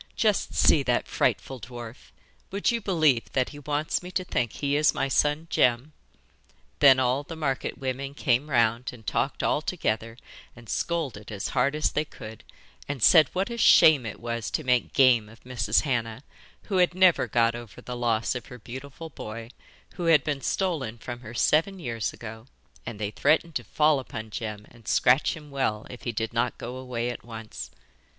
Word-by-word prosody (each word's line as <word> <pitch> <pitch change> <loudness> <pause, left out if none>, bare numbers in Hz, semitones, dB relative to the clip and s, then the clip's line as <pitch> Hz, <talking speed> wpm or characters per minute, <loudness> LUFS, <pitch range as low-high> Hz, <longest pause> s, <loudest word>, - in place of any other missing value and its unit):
'Just 210 -3 +1
see 150 - +5
that 125 -3 0
frightful 125 +3 -1
dwarf 120 0 -10 0.4
would 200 +4 0
you 235 -1 -1
believe 155 - +2
that 130 -2 +1
he 145 - -10
wants 150 +1 -1
me 180 - -8
to 185 0 -2
think 125 -9 -1
he 140 0 -1
is 150 +1 +3
my 135 - 0
son 150 +3 +1
Jem?' 125 +5 +2 0.9
Then 135 -2 +7
all 130 +2 +1
the 165 +3 -9
market 140 -4 -2
women 135 +1 -4
came 135 0 +1
round 120 -1 +2
and 110 -3 -14
talked - - -1
all - - +1
together 115 +1 -2 0.4
and 120 -1 -14
scolded 135 -13 -3
as 100 -2 -4
hard 140 +3 +1
as 155 - +1
they 150 - 0
could, 110 -7 -11 0.5
and 140 -6 -3
said 160 -6 +7
what 190 +5 -1
a 235 - -5
shame 150 - +6
it 105 - -7
was 115 -1 -4
to - - -2
make 125 -1 +1
game 120 -5 +4
of 115 +1 -17
Mrs. 115 -4 +1
Hannah, 120 -3 -2 0.4
who 195 - -2
had 180 -1 +3
never 185 -2 +4
got 115 -1 +2
over 120 -3 -9
the 125 - -7
loss 115 -2 0
of 125 -3 -6
her 125 - -10
beautiful 130 +7 -9
boy, 115 -1 -8 0.5
who 175 - -3
had 160 -5 +5
been 145 -2 -2
stolen 150 - -1
from 120 +1 -7
her 120 -1 -10
seven 165 - +2
years 115 - -3
ago, 110 +1 -10 0.4
and 115 -2 -5
they 105 0 -3
threatened 160 +8 +2
to - - -2
fall 150 -2 +2
upon 110 -4 -7
Jem 105 -1 -5
and 115 -3 -19
scratch 130 +6 +3
him 150 -2 -13
well 110 -6 -1
if 125 - -11
he 120 - -1
did 115 +1 -3
not 120 +1 0
go 125 +2 -6
away 125 -2 -3
at 120 - -9
once. 110 - -8
125 Hz, 190 wpm, -26 LUFS, 115-150 Hz, 0.9 s, Then